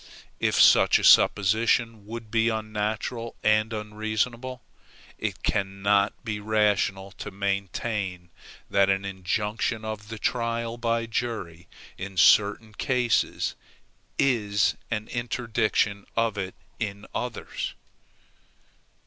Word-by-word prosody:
If -, -, +1 dB
such -, -, +7 dB
a -, -, -4 dB
supposition 110 Hz, +2 st, +4 dB
would 115 Hz, -1 st, -7 dB
be 115 Hz, 0 st, +3 dB
unnatural 110 Hz, +1 st, -3 dB
and 110 Hz, +1 st, +3 dB
unreasonable, 110 Hz, +4 st, -3 dB, 0.6 s
it -, -, -3 dB
cannot 100 Hz, +2 st, +1 dB
be 105 Hz, -2 st, -3 dB
rational 105 Hz, -2 st, +1 dB
to -, -, -5 dB
maintain 100 Hz, -1 st, -3 dB, 0.4 s
that 100 Hz, 0 st, +3 dB
an 95 Hz, 0 st, +1 dB
injunction 105 Hz, +4 st, -2 dB
of 110 Hz, -1 st, -5 dB
the 115 Hz, 0 st, -7 dB
trial 115 Hz, 0 st, -1 dB
by 115 Hz, -1 st, 0 dB
jury 110 Hz, -8 st, -4 dB, 0.3 s
in 95 Hz, -1 st, -6 dB
certain 105 Hz, +4 st, +4 dB
cases 125 Hz, +1 st, 0 dB, 0.6 s
is 105 Hz, -7 st, +2 dB
an 110 Hz, -2 st, -3 dB
interdiction 115 Hz, -4 st, -1 dB
of 115 Hz, -2 st, +2 dB
it 95 Hz, -2 st, -4 dB, 0.2 s
in 105 Hz, -2 st, -4 dB
others. 125 Hz, -3 st, -4 dB
110 Hz, 105 wpm, -26 LUFS, 100-115 Hz, 0.6 s, such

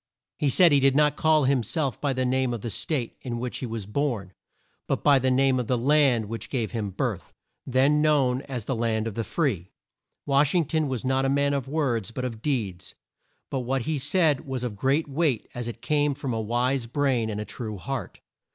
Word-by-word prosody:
He 145 Hz, -, +2 dB
said 170 Hz, +5 st, +5 dB
he 145 Hz, -, +5 dB
did 135 Hz, 0 st, +3 dB
not 150 Hz, 0 st, +4 dB
call 155 Hz, -1 st, +3 dB
him 135 Hz, -1 st, +2 dB
self 135 Hz, -, -2 dB
by 145 Hz, -, +1 dB
the 130 Hz, -1 st, 0 dB
name 130 Hz, -1 st, +1 dB
of 115 Hz, -, -7 dB
the 115 Hz, -, -3 dB
State 130 Hz, -3 st, -3 dB
in 120 Hz, -2 st, -4 dB
which 125 Hz, +1 st, -4 dB
he 125 Hz, -, -4 dB
was 115 Hz, -3 st, -5 dB
born, 105 Hz, -5 st, -2 dB, 0.5 s
but -, -, -1 dB
by 140 Hz, -2 st, +6 dB
the 130 Hz, 0 st, +1 dB
name 130 Hz, 0 st, +3 dB
of 120 Hz, -, -3 dB
the 125 Hz, -, +1 dB
land 135 Hz, -3 st, +3 dB
which 115 Hz, +2 st, -6 dB
gave 120 Hz, -5 st, -2 dB
him 110 Hz, -4 st, -3 dB
birth 95 Hz, -, -3 dB, 0.4 s
then 135 Hz, +4 st, +3 dB
known 135 Hz, -4 st, +2 dB
as 125 Hz, -5 st, -4 dB
"the 135 Hz, -, -1 dB
land 115 Hz, -1 st, 0 dB
of 115 Hz, -, -3 dB
the 115 Hz, -, -2 dB
free." 110 Hz, -, -1 dB, 0.6 s
Wash 145 Hz, +3 st, +3 dB
ing 170 Hz, -3 st, +3 dB
ton 155 Hz, +1 st, 0 dB
was 130 Hz, -1 st, -3 dB
not 130 Hz, +1 st, +1 dB
a 135 Hz, -, +1 dB
man 140 Hz, +1 st, +2 dB
of 140 Hz, -3 st, -2 dB
words, 135 Hz, -8 st, -1 dB
but 125 Hz, +2 st, -4 dB
of 115 Hz, -3 st, -5 dB
deeds. 100 Hz, -11 st, -3 dB, 0.6 s
But 135 Hz, -, -1 dB
what 130 Hz, 0 st, -1 dB
he 155 Hz, +1 st, -1 dB
said 150 Hz, 0 st, +2 dB
was 130 Hz, -2 st, -3 dB
of 120 Hz, -4 st, -3 dB
great 135 Hz, +9 st, +1 dB
weight 140 Hz, -5 st, 0 dB
as 120 Hz, -1 st, -4 dB
it 120 Hz, -, -7 dB
came 145 Hz, -2 st, +1 dB
from 135 Hz, -3 st, -3 dB
a 110 Hz, -, -1 dB
wise 120 Hz, +3 st, 0 dB
brain 125 Hz, -3 st, 0 dB
and 105 Hz, -1 st, -3 dB
a 105 Hz, -, -4 dB
true 110 Hz, -3 st, -6 dB
heart. 90 Hz, -, -5 dB
130 Hz, 225 wpm, -26 LUFS, 115-145 Hz, 0.6 s, by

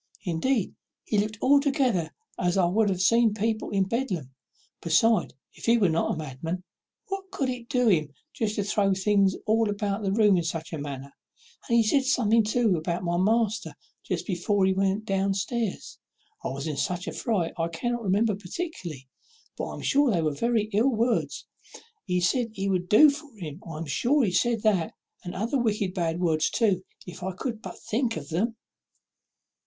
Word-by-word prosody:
Indeed, 195 Hz, +5 st, 0 dB, 0.3 s
he 210 Hz, -, 0 dB
looked 210 Hz, +1 st, -2 dB
altogether 270 Hz, -, +3 dB, 0.3 s
as 180 Hz, +1 st, +1 dB
I 180 Hz, -2 st, +4 dB, 0.2 s
have 190 Hz, -2 st, 0 dB
seen 230 Hz, +2 st, +4 dB
people 220 Hz, +1 st, -1 dB
in 195 Hz, -2 st, +2 dB
Bedlam; 190 Hz, -, -2 dB, 0.5 s
besides, 180 Hz, -, +2 dB, 0.2 s
if -, -, -10 dB
he 235 Hz, +1 st, +5 dB
was 195 Hz, -7 st, +3 dB
not 165 Hz, -, 0 dB
a -, -, -7 dB
madman, 160 Hz, +5 st, -5 dB, 0.5 s
what 390 Hz, 0 st, -4 dB
good 380 Hz, -, -11 dB
could 270 Hz, -3 st, 0 dB
it 245 Hz, -2 st, -6 dB
do 250 Hz, -3 st, +2 dB
him 155 Hz, -8 st, +2 dB, 0.3 s
to 225 Hz, -5 st, +1 dB, 0.2 s
throw 200 Hz, 0 st, +1 dB
the 190 Hz, -, +2 dB
things 195 Hz, 0 st, +2 dB
all 220 Hz, 0 st, +2 dB
about 205 Hz, 0 st, -2 dB
the 195 Hz, -2 st, -1 dB
room 205 Hz, -2 st, +4 dB
in 170 Hz, -, 0 dB
such 165 Hz, 0 st, -4 dB
a 160 Hz, -, -3 dB
manner? 140 Hz, -1 st, -6 dB, 0.6 s
and 235 Hz, -, +4 dB
he 230 Hz, -, +5 dB
said 270 Hz, +6 st, +2 dB
something 230 Hz, -4 st, +3 dB
too 220 Hz, -2 st, +2 dB
about 170 Hz, +3 st, -2 dB
my 175 Hz, 0 st, 0 dB
master 220 Hz, +3 st, +1 dB, 0.3 s
just -, -, -3 dB
before 190 Hz, +1 st, +1 dB
he 190 Hz, -, +3 dB
went 195 Hz, +2 st, 0 dB
down 195 Hz, -1 st, 0 dB
stairs. 225 Hz, +1 st, -3 dB, 0.4 s
I -, -, -2 dB
was 140 Hz, +1 st, -4 dB
in 155 Hz, -3 st, -3 dB
such 180 Hz, +5 st, -2 dB
a -, -, -2 dB
fright 200 Hz, -9 st, -1 dB
I 165 Hz, -, +1 dB
cannot 240 Hz, +8 st, -3 dB
remember 210 Hz, +2 st, +2 dB
particularly, 180 Hz, -, -6 dB, 0.5 s
but -, -, -3 dB
I -, -, -6 dB
am -, -, -8 dB
sure 285 Hz, 0 st, +3 dB
they 175 Hz, -7 st, +1 dB
were 155 Hz, -1 st, 0 dB
very 230 Hz, +6 st, +1 dB
ill 225 Hz, +6 st, +4 dB
words; 235 Hz, -1 st, 0 dB, 0.6 s
he 180 Hz, -2 st, 0 dB
said 235 Hz, +7 st, +2 dB
he 195 Hz, -2 st, -3 dB
would 180 Hz, -2 st, -1 dB
do 295 Hz, +8 st, +8 dB
for 295 Hz, 0 st, -9 dB
him 160 Hz, -2 st, -7 dB
I 155 Hz, -, -6 dB
am 165 Hz, -, -4 dB
sure 250 Hz, -, +2 dB
he 200 Hz, -, +1 dB
said 230 Hz, +3 st, +1 dB
that, 195 Hz, -7 st, +1 dB, 0.3 s
and 175 Hz, -, -6 dB
other 230 Hz, +8 st, 0 dB
wicked 210 Hz, -5 st, 0 dB
bad 170 Hz, -2 st, -1 dB
words 160 Hz, -3 st, +2 dB
too, 200 Hz, -6 st, +1 dB, 0.2 s
if 180 Hz, +1 st, -10 dB
I 190 Hz, +1 st, -3 dB
could 225 Hz, +3 st, -4 dB
but -, -, -8 dB
think 230 Hz, -1 st, -1 dB
of 140 Hz, -2 st, -8 dB
them." 220 Hz, +8 st, 0 dB
200 Hz, 190 wpm, -26 LUFS, 175-230 Hz, 0.6 s, do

